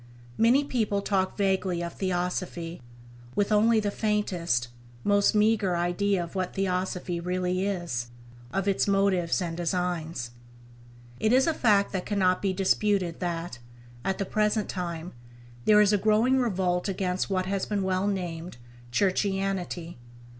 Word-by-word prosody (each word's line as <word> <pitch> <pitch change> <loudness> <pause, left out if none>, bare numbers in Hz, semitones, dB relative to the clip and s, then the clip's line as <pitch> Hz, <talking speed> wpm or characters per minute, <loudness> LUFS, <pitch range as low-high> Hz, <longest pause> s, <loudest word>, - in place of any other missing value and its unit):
Many 245 +5 +4
people 215 -7 -1
talk 190 -2 0
vaguely 190 -3 0
of 170 - -5
Theosophy, 180 -3 -3 0.5
with 205 +1 +1
only 220 +2 +4
the 205 -1 -1
faintest, 180 - 0 0.3
most 205 +1 +3
meagre 210 -3 +3
idea 175 +2 +1
of 170 - -9
what 185 -2 -3
Theosophy 180 -2 -1
really 180 +2 -1
is, 170 -12 -3 0.4
of 195 0 -1
its 200 0 +2
motives 195 -3 +2
and 165 -1 -4
designs. 170 -7 -2 0.9
It 215 - +2
is 260 +2 +5
a 325 - +2
fact 210 -8 +3
that 185 -2 -3
cannot 185 -3 +2
be 195 - +1
disputed 190 -2 +1
that, 170 -6 -3 0.4
at 190 0 -1
the 200 - -2
present 210 +1 0
time, 170 -2 -4 0.5
there 210 -1 +6
is 210 0 +4
a 205 - +3
growing 220 +6 +3
revolt 185 -6 0
against 185 -1 -1
what 185 -1 0
has 195 0 -2
been 205 -2 -1
well 190 +1 0
named 175 -6 -4 0.3
"Churchianity." 190 -1 -1
190 Hz, 140 wpm, -27 LUFS, 175-205 Hz, 0.9 s, there